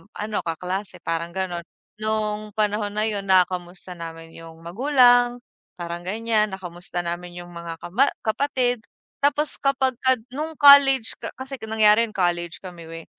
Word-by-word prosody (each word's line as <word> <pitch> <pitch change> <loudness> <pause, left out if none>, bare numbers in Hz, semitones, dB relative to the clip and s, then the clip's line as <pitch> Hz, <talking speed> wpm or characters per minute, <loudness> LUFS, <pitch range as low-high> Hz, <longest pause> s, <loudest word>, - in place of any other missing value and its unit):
ano 210 0 -3
kaklase 180 +4 -4
parang 165 +1 -2
ganon, 175 -3 -3 0.4
nung 215 -1 -2
panahon 210 -1 0
na 215 - +1
yun 205 -2 -3
nakukumusta 180 -1 +1
namin 165 0 -8
yung 165 0 -12
magulang 245 +4 +4 0.4
parang 175 0 -6
ganyan, 215 0 0
nakamusta 175 -1 -6
namin 175 +1 -5
yung 175 0 -10
mga 170 -1 -7
kama 240 +11 +2 0.2
kapatid. 245 +1 0 0.4
Tapos 290 +1 +1
kapag 270 -1 +1
ka 260 0 +3 0.2
nung 310 +4 -5
college 280 -4 +7
ka - - -6
kasi 265 +1 -7
nangyari 215 0 +4
yun 215 - -15
college 175 -2 -1
kami, 175 -2 -9 0.2
eh, - - -22
210 Hz, 145 wpm, -23 LUFS, 175-245 Hz, 0.4 s, college